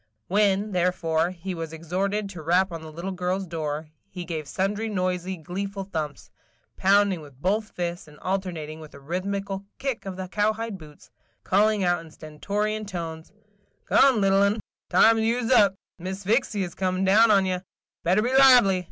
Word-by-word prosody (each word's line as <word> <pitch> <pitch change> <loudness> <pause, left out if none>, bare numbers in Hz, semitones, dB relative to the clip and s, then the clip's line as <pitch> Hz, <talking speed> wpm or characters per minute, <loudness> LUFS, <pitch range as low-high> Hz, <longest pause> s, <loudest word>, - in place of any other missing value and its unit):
When, 205 +1 +2
therefore, 175 -2 +1
he 185 +1 -6
was 165 -2 -5
exhorted 190 +6 -2
to 175 -5 -8
rap 180 +4 +2
on 165 -1 -6
the 160 -1 -9
little 170 +5 -5
girl's 185 +1 -2
door, 155 -2 -4 0.2
he 180 -2 -7
gave 160 -4 -4
sundry 205 +7 -1
noisy, 185 -2 -2
gleeful 195 +5 -5
thumps, 155 -7 -5 0.2
– - - -40
pounding 195 -2 +3
with 140 -4 -15
both 210 +7 0
fists, 175 -1 -4
and 150 -1 -15
alternating 175 -5 -3
with 155 -2 -12
a - - -11
rhythmical 195 +5 -3
kick 265 -7 -3
of 185 -1 -5
the 185 0 -5
cowhide 215 +1 -1
boots, 150 -2 -15 0.3
calling 210 +1 +2
out 175 -2 +1
in 165 - -13
stentorian 205 +8 -3
tones: 165 -4 -6 0.5
"Come, 270 -4 +5
little 195 0 +4
un, 200 +2 +2 0.2
– - - -69
time 225 0 +5
you 230 +2 +1
's - - -1
up. 205 -6 +5 0.2
Miss 190 +3 -5
Sphyxy's 205 -5 0
comin' 185 0 -1
down 215 +4 +6
on 200 -2 +5
ye. 185 -1 -1 0.4
Better 185 +5 +3
be 250 +2 0
lively! 250 -8 +7
190 Hz, 175 wpm, -25 LUFS, 170-205 Hz, 0.5 s, lively